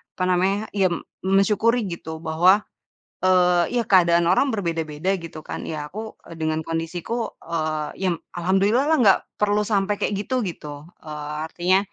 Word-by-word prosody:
apa 185 - -2
namanya, 190 +3 +1
ya 195 -2 +2 0.4
mensyukuri 210 +5 +3
gitu, 160 -1 -7
bahwa, 175 +6 +4 0.6
eee, 180 +1 +3
ya 240 - +2
keadaan 175 -5 +4
orang 230 +9 +3
berbeda-beda 165 -2 -2
gitu 165 -2 -9
kan, - - -6
ya 150 -2 -5
aku, 220 +2 -7
eee, 165 - -11
dengan 155 0 -1
kondisiku, 165 +8 -3
eee, 155 -2 -2 0.2
ya - - +3 0.2
alhamdulillah 195 +9 +2
lah 320 0 +4
nggak 195 -3 +6 0.2
perlu 210 0 +1
sampai 205 -1 0
kayak - - 0
gitu, 230 +6 -1
gitu. 150 -3 -8 0.2
Eee, 150 -1 -6 0.2
artinya, 180 +2 +3
180 Hz, 150 wpm, -23 LUFS, 160-205 Hz, 0.6 s, nggak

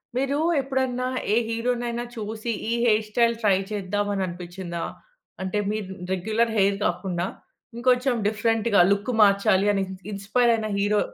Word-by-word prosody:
మీరు 275 +2 0 0.2
ఎప్పుడన్నా 260 -2 -1 0.3
ఏ - - +4
హీరోనైన 235 +1 -1
చూసి 220 +1 -4 0.2
ఈ - - 0
హెయిర్ 215 -2 +3
స్టైల్ 235 +1 +2
ట్రై 200 -4 +4
చేద్దాం 205 0 -1
అని 195 - -1
అనిపించిందా? 175 -1 -6 0.6
అంటే 190 +2 -2
మీరు 210 -3 -4 0.2
రెగ్యులర్ 220 +5 0
హెయిర్ 200 0 +3
గాకుండా 180 -2 -1 0.5
ఇంకొంచెం 250 +2 +2
డిఫరెంట్‌గా 220 0 +1
లుక్ 200 +5 0
మార్చాలి 200 -1 +4
అని 195 - +1
ఇన్ 190 0 -8
ఇన్‌స్పైర్ 215 +5 +2
అయిన 220 -1 -1
హీరో 205 +1 +2
215 Hz, 140 wpm, -25 LUFS, 195-235 Hz, 0.6 s, ఏ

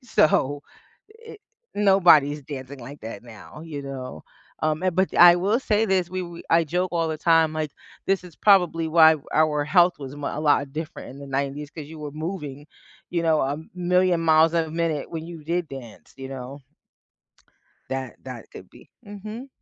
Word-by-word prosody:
So, 145 - +2 0.5
it 450 -1 -14 0.4
nobody's 175 -8 +5
dancing 135 0 -8
like 130 +4 -10
that 110 -1 -8
now, 120 +5 -12
you 150 -3 -6
know, 130 - -7 0.4
um, 155 +2 0
and 185 -2 0
but 190 +1 +1
I 175 0 +9
will 200 +6 +1
say 220 -4 +1
this, 185 -3 +1
we 185 +1 -3
we 170 -1 -9
I 165 0 +4
joke 180 +4 -1
all 165 -1 +1
the 155 -1 -3
time, 165 -1 +3
like, 155 -2 -3 0.4
this 195 -1 +1
is 175 -4 -13
probably 180 -5 +3
why 160 0 +6 0.2
our 150 -1 +2
health 175 +3 +4
was 135 0 -8
mu 145 -1 -4
a - - -4
lot 145 -2 +2
different 155 0 -6
in 140 - -12
the 140 - -9
90s 140 +2 -3
'cause 155 -2 -8
you 160 +1 -10
were 150 -1 -6
moving, 150 -3 -6 0.4
you 170 -1 -1
know, 160 -2 +3
a 140 +2 -1 0.2
million 180 -1 +2
miles 160 0 +4
a 165 -2 0
minute 165 -2 -2
when 160 -1 -5
you 165 -3 -9
did 170 +2 -2
dance, 120 -6 -11
you 135 0 -7
know. 135 +1 -8 1.3
That 130 -3 -4
that 125 -3 -9
could 95 - -12
be. - - -18 0.2
Mhm. 215 +5 -8
160 Hz, 185 wpm, -24 LUFS, 140-175 Hz, 1.3 s, I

